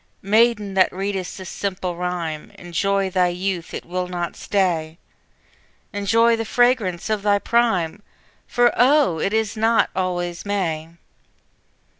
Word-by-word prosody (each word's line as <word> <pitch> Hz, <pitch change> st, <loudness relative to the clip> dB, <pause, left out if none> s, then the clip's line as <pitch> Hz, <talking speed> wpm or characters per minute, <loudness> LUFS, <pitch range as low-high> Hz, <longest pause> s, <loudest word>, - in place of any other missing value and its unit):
Maiden, 210 Hz, 0 st, +2 dB
that 190 Hz, -1 st, +3 dB
read'st 195 Hz, -1 st, -4 dB
this 190 Hz, -1 st, -8 dB
simple 185 Hz, -3 st, -3 dB
rhyme, 170 Hz, -3 st, -4 dB
Enjoy 195 Hz, +3 st, -1 dB
thy 180 Hz, -1 st, +3 dB
youth, 180 Hz, -1 st, -3 dB
it -, -, -6 dB
will 180 Hz, +1 st, -3 dB
not 175 Hz, -1 st, -4 dB
stay; 170 Hz, -5 st, -1 dB, 1.0 s
Enjoy 225 Hz, +4 st, +3 dB
the 225 Hz, -, -2 dB
fragrance 225 Hz, -7 st, +1 dB
of 215 Hz, -2 st, -1 dB
thy 205 Hz, 0 st, +3 dB
prime, 205 Hz, -5 st, +1 dB, 0.5 s
For 240 Hz, 0 st, +3 dB
oh, 260 Hz, -, +4 dB
it 195 Hz, -, 0 dB
is 220 Hz, -1 st, 0 dB
not 225 Hz, +1 st, +2 dB
always 175 Hz, -2 st, -2 dB
May! 165 Hz, -6 st, -2 dB
195 Hz, 130 wpm, -22 LUFS, 175-215 Hz, 1.0 s, oh